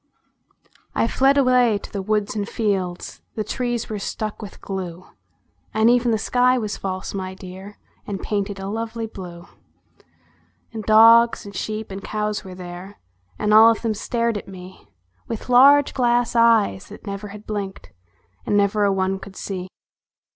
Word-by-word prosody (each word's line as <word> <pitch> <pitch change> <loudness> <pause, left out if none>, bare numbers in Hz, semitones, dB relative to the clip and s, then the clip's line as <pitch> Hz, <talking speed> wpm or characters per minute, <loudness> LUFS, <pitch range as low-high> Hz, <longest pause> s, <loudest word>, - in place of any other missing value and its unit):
I - - +2
fled 270 +4 +3
away 250 -5 +4
to - - -11
the 200 - -2
woods 210 +1 -1
and 205 -1 -3
fields; 190 -6 -2
The 215 - -2
trees 240 +1 -2
were 215 -2 -4
stuck 215 +2 -4
with 205 -2 -9
glue; 185 -2 -6 0.7
And 220 +2 +5
even 245 0 +2
the 225 - +2
sky 250 +3 +2
was 215 -4 -3
false, 185 -1 -5
my 190 -1 -5
dear, 190 +2 -10 0.3
And 200 -2 -4
painted 200 -1 -3
a 195 - -5
lovely 225 +2 -4
blue. 180 -5 -9 1.3
And 220 -1 -5
dogs 230 +2 +6
and 200 -1 -10
sheep 215 0 -4
and 195 +1 -7
cows 210 -1 -2
were 185 -2 -9
there, 180 +2 -9 0.4
And 210 - +1
all 220 +1 +9
of 225 0 0
them 225 -2 0
stared 230 +1 -1
at - - -14
me 185 -1 -12 0.4
"With 230 +1 -6
large 280 +3 +6
glass 240 -2 +1
eyes 230 -4 +3
that 210 - -13
never 200 0 -5
had 210 +1 -11
blinked, 200 - -5 0.5
And 205 - +1
never 205 +1 +2
a 200 - +3
one 190 0 0
could 195 0 -11
see. 185 -2 -5
210 Hz, 165 wpm, -22 LUFS, 195-230 Hz, 1.3 s, all